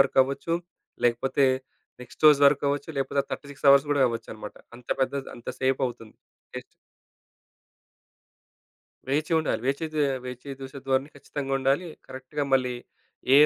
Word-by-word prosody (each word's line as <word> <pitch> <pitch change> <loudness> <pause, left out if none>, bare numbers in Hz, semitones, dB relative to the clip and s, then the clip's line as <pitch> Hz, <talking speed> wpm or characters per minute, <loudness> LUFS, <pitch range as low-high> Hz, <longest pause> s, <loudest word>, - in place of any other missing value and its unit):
వరకవ్వచ్చు. 135 +5 +2 0.5
లేకపోతే 130 +3 +3 0.6
నెక్స్‌ట్ 125 +5 -9
రోజు 145 -1 +6
వరకవ్వచ్చు. 140 +2 +1
లేకపోతే 140 +1 +1
36 140 0 -5
అవర్స్ 140 +1 +6
గూడా 140 -2 +3
అవ్వొచ్చన్నమాట. 110 -2 -7 0.2
అంత 125 0 -17
పెద్ద, 130 +1 +1 0.2
అంత 120 - -11
సేపు 130 0 +1
అవుతుంది 115 -2 -12 0.4
టెస్ట్. - - -5 2.5
వేచి 150 +4 0
ఉండాలి. 155 - -1
వేచి 140 +4 0
జూ 155 - +1 0.3
వేచి 125 +2 -8
జూషె 135 0 -8
ధోరణి 135 +2 +1
ఖచ్చితంగుండాలి. 135 +3 -1 0.2
కరెక్ట్‌గా 130 +3 -4
మళ్ళీ 125 -2 +3 0.6
ఏ - - +9
135 Hz, 120 wpm, -26 LUFS, 130-145 Hz, 2.5 s, ఏ